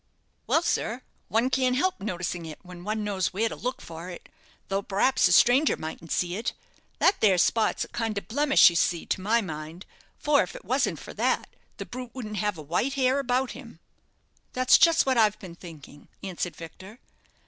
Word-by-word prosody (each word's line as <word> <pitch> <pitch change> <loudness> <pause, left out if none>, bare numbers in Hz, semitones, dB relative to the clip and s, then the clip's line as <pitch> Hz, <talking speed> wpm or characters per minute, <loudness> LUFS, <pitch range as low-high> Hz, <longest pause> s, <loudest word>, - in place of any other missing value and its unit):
"Well, 325 - +2
sir, 245 -5 -1 0.2
one 235 +4 +1
can't 255 -1 +2
help 370 - 0
noticing 180 -3 -3
it 155 - -8
when 180 -1 -11
one 215 +2 -2
knows 200 -3 -1
where 220 +4 +1
to - - -5
look 250 +1 -4
for 165 +2 -9
it, 175 - -10 0.4
though 195 0 -1
p'raps 200 +7 +2
a - - -1
stranger 255 +6 +5
mightn't 160 0 -7
see 175 0 0
it. 230 - -3 0.4
That 395 - +3
there 195 -4 +4
spot's 215 +5 +2
a - - -16
kind 225 -3 -3
of 200 - -2
a - - -30
blemish, 275 -3 +5
you - - -7
see, 170 0 +1
to - - -2
my 225 +4 +2
mind; 160 -1 -7 0.3
for, 295 -1 +3
if - - -5
it - - -11
wasn't - - 0
for - - -10
that, - - 0 0.3
the - - -6
brute 250 0 -8
wouldn't 215 -5 -6
have 210 -2 -1
a 155 - -8
white 180 - -1
hair 265 0 +2
about 260 -1 0
him." - - -11 0.7
"That's 255 0 +5
just 330 -1 +5
what 260 -3 +2
I've 210 -2 +3
been 185 -4 -10
thinking," 160 -4 -13 0.2
answered 180 -2 -4
Victor. 190 +6 -11
210 Hz, 200 wpm, -26 LUFS, 180-255 Hz, 0.7 s, stranger